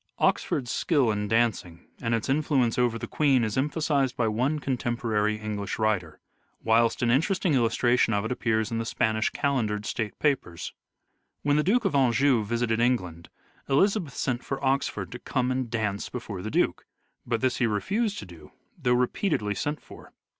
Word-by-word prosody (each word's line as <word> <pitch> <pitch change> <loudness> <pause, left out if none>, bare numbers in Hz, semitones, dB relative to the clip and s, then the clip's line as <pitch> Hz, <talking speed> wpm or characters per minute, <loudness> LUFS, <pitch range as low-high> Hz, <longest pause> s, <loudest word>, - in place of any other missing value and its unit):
Oxford's 125 -5 0
skill 140 -9 +2
in 105 0 -2
dancing 110 -7 0
and 115 -1 +1
its 115 - -3
influence 135 -4 +1
over 120 -2 +2
the - - -5
Queen 135 -5 +2
is 110 -2 -1
emphasized 140 -2 0
by 115 - +1
one 125 +8 0
contemporary 120 -6 -1
English 105 -2 -4
writer, 95 -8 -1 0.4
whilst 115 +2 +3
an 120 - +3
interesting 165 +5 +2
illustration 120 -1 +2
of 100 0 0
it 110 - -3
appears 110 -3 0
in 115 - -1
the 115 - -2
Spanish 110 -1 0
Calendered 120 -8 -1
State 110 -3 -3
Papers. 130 - -1 0.7
When 145 0 +2
the - - +4
Duke 225 +6 +2
of 195 - +1
Anjou 135 -2 +3
visited 115 +1 0
England, 90 -9 0 0.4
Elizabeth 170 - +2
sent 125 -2 -2
for 135 0 -4
Oxford 135 +1 0
to 120 - -7
come 125 -1 -1
and 130 -2 -2
dance 110 -3 -2
before 110 -6 -6
the 110 - -4
Duke: - - 0 0.4
but 115 -1 -2
this 130 -2 +1
he 120 - +2
refused 200 - -1
to - - -6
do 85 -3 -14 0.2
though 125 - +1
repeatedly 125 - 0
sent 145 +9 -3
for. - - -14
120 Hz, 170 wpm, -27 LUFS, 110-135 Hz, 0.7 s, the